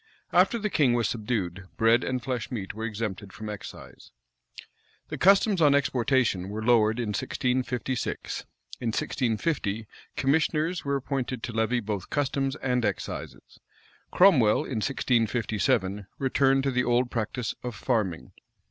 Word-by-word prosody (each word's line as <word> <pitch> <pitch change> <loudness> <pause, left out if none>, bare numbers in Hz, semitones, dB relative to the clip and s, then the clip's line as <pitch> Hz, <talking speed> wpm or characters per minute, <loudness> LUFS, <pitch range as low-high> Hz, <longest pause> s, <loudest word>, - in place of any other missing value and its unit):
After 235 - +4
the 210 -2 -2
king 135 -5 +3
was 120 -2 +1
subdued 100 -5 -3
bread 115 +2 +4
and 130 -1 -2
flesh 125 -3 -3
meat 100 -6 -5
were 110 +2 -5
exempted 105 -3 -4
from 110 +2 -7
excise. 105 -2 -9 1.0
The - - -4
customs 195 0 +4
on 145 -2 +6
exportation 125 -7 +1
were 110 +2 -4
lowered 115 -2 +4
in 115 -3 -2
1656.[] 125 +3 -2 0.3
In 120 - -3
1650, 115 -1 -1 0.3
commissioners 155 +4 +1
were 140 0 0
appointed 130 -3 -3
to - - -3
levy 110 +2 +1
both 105 -3 -4
customs 135 -1 0
and 125 -4 -1
excises. - - -5 0.5
Cromwell, 140 - +5
in 115 -5 -3
1657, 115 -5 0
returned 135 0 +2
to 135 - +1
the 125 0 +1
old 120 0 +1
practice 115 +1 -2
of 125 -2 -5
farming. 100 -7 -1
120 Hz, 135 wpm, -27 LUFS, 110-135 Hz, 1.0 s, on